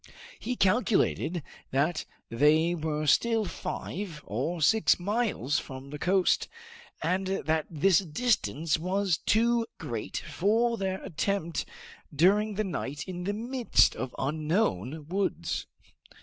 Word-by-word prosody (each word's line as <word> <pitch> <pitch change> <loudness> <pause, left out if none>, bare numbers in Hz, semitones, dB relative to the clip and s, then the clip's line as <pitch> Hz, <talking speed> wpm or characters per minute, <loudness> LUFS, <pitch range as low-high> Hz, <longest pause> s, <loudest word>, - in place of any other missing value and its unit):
He 250 +3 -3
calculated 195 - +1 0.3
that 155 +5 0 0.2
they 155 +7 +3
were 155 -2 -2
still 225 - +3
five 175 -3 -5
or 140 - -2
six 220 +8 +4
miles 195 - 0
from 135 +1 -9
the 150 - -6
coast, 185 +2 +2 0.6
and 185 +4 0 0.4
this 170 +3 +4
distance 160 - 0
was 185 0 0
too 230 +1 +2
great 115 - -5
for 210 +10 +1
them 190 -3 -2
to - - -10
attempt 170 0 -2 0.4
during 200 +7 +3
the 215 - 0
night 145 -6 -4
in 180 -1 -5
the 205 - 0
midst 240 +2 +2
of 130 -1 -5
unknown 150 - -1
woods. 195 +3 -2
175 Hz, 120 wpm, -28 LUFS, 150-205 Hz, 0.6 s, six